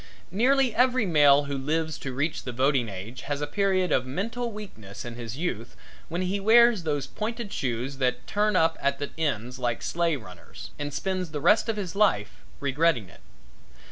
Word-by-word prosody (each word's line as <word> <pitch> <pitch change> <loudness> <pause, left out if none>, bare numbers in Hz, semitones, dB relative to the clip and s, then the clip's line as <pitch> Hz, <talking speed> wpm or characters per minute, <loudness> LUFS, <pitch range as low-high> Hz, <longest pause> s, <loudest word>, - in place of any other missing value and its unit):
Nearly 255 +5 +3
every 250 -1 +3
male 145 -5 +5
who 140 0 -4
lives 155 +3 -1
to 135 - -5
reach 145 +5 -2
the 125 - -5
voting 130 -1 +1
age 105 +6 -8
has 145 -1 -1
a 145 - -1
period 185 +1 +1
of 130 - +3
mental 230 - -3
weakness 125 - -9
in 120 - -6
his 120 +1 -7
youth 125 -9 -4 0.3
when 175 +3 -2
he 190 +2 -1
wears 230 +1 +6
those 145 -4 -1
pointed 225 -1 -5
shoes 130 +2 -2
that 125 -1 0
turn 210 0 +1
up 165 -2 +2
at 140 0 +1
the 145 0 -5
ends, 125 -5 -2
like 120 -2 -2
sleigh 170 -2 0
runners; 90 -8 -11
and 145 0 -3
spends 185 +2 -2
the 150 -1 -4
rest 215 +10 +4
of 220 - -1
his 190 -4 -4
life 195 - +2 0.2
regretting 140 - +1
it. - - -17
150 Hz, 185 wpm, -26 LUFS, 130-200 Hz, 0.3 s, wears